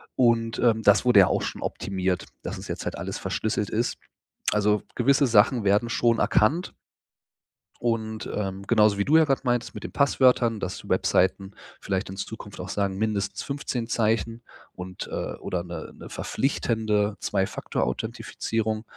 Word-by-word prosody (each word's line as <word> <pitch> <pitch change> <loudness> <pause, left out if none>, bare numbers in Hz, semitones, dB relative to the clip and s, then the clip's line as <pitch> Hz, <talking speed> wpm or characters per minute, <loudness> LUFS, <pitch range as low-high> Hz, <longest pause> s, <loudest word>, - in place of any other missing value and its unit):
Und, 115 -2 +2
ähm, 115 -2 +3
das 100 +2 +5
wurde 120 -6 +7
ja 90 - +5
auch - - 0
schon - - -4
optimiert, 95 -2 -2 0.2
dass - - -5
es - - -9
jetzt - - -4
halt - - -3
alles - - -4
verschlüsselt 105 -2 -2
ist. 115 +3 -1 0.6
Also, 105 0 +2
gewisse 140 +3 +3
Sachen 115 0 +4
werden 100 +4 +3
schon 115 -2 +2
erkannt. 150 +15 +2 1.1
Und, 110 -2 -2
ähm, 100 -1 -4
genauso 105 -3 +4
wie 100 - 0
du 155 - +3
ja 160 - +7
gerade 135 -3 +1
meintest 120 -1 0
mit - - -8
den - - -7
Passwörtern, 125 -5 +3
dass 95 - -4
die - - -13
Webseiten 95 +1 +1 0.3
vielleicht 95 -1 -2
in 95 - -7
Zukunft 105 0 -7
auch 90 - -5
sagen, 100 0 -1
mindestens 105 -2 -1
15 135 -5 -3
Zeichen 115 0 0 0.3
und, 90 0 -7
äh, - - -4
oder 90 -1 -4
'ne 85 -1 -8
'ne - - -11
verpflichtende 110 -6 0
2-Faktor-Authentifizierung, 110 - -2
110 Hz, 160 wpm, -25 LUFS, 100-120 Hz, 1.1 s, wurde